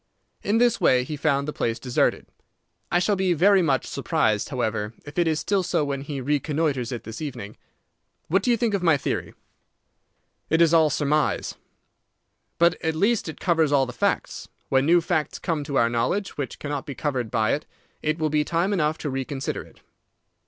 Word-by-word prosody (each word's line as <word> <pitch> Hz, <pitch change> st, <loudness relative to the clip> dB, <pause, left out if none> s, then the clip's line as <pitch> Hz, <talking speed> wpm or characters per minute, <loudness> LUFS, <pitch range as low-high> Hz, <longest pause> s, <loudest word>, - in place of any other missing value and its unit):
In 210 Hz, +2 st, +1 dB
this 240 Hz, -1 st, +3 dB
way 125 Hz, -1 st, +4 dB
he 150 Hz, +4 st, -5 dB
found 140 Hz, -1 st, 0 dB
the 150 Hz, -, -3 dB
place 115 Hz, 0 st, -1 dB
deserted. 125 Hz, +1 st, 0 dB, 0.7 s
I -, -, +3 dB
shall 200 Hz, +3 st, +2 dB
be 190 Hz, -2 st, +1 dB
very 190 Hz, +4 st, +5 dB
much 140 Hz, -6 st, +1 dB
surprised, 105 Hz, -2 st, 0 dB
however, 110 Hz, -4 st, -2 dB
if 145 Hz, +3 st, -5 dB
it 170 Hz, -, +3 dB
is 155 Hz, -1 st, +1 dB
still 195 Hz, +6 st, +1 dB
so 175 Hz, -4 st, 0 dB
when 140 Hz, -1 st, -3 dB
he 140 Hz, 0 st, -5 dB
reconnoitres 145 Hz, -2 st, -1 dB
it 120 Hz, -, -5 dB
this 110 Hz, +4 st, -8 dB
evening. 125 Hz, -9 st, -6 dB, 0.7 s
What 190 Hz, +5 st, +2 dB
do -, -, -1 dB
you 240 Hz, -, +4 dB
think 230 Hz, -1 st, 0 dB
of 200 Hz, -, 0 dB
my 165 Hz, -4 st, +4 dB
theory?" -, -, -3 dB, 1.1 s
"It 160 Hz, -, +2 dB
is 170 Hz, -1 st, +5 dB
all 160 Hz, -2 st, +5 dB
surmise." 150 Hz, +1 st, 0 dB, 1.0 s
"But 170 Hz, +1 st, +2 dB
at 160 Hz, -1 st, 0 dB
least 205 Hz, +2 st, +1 dB
it 160 Hz, -, -8 dB
covers 165 Hz, -4 st, +2 dB
all 140 Hz, -2 st, +4 dB
the 125 Hz, -, -7 dB
facts. -, -, -1 dB, 0.2 s
When 135 Hz, +1 st, +2 dB
new 175 Hz, +1 st, +5 dB
facts 155 Hz, -3 st, -1 dB
come 160 Hz, -3 st, -2 dB
to 140 Hz, -2 st, -2 dB
our 115 Hz, -, +4 dB
knowledge 120 Hz, +13 st, -1 dB
which 140 Hz, -2 st, -4 dB
cannot 145 Hz, -2 st, -4 dB
be 140 Hz, -, -5 dB
covered 130 Hz, -5 st, -2 dB
by 110 Hz, -2 st, +1 dB
it, 150 Hz, -, -3 dB, 0.3 s
it 155 Hz, +1 st, 0 dB
will 155 Hz, -2 st, -1 dB
be 150 Hz, 0 st, +2 dB
time 170 Hz, +6 st, 0 dB
enough 155 Hz, -4 st, +1 dB
to 150 Hz, -, -4 dB
reconsider 135 Hz, +1 st, -3 dB
it. -, -, -17 dB
150 Hz, 195 wpm, -24 LUFS, 135-170 Hz, 1.1 s, very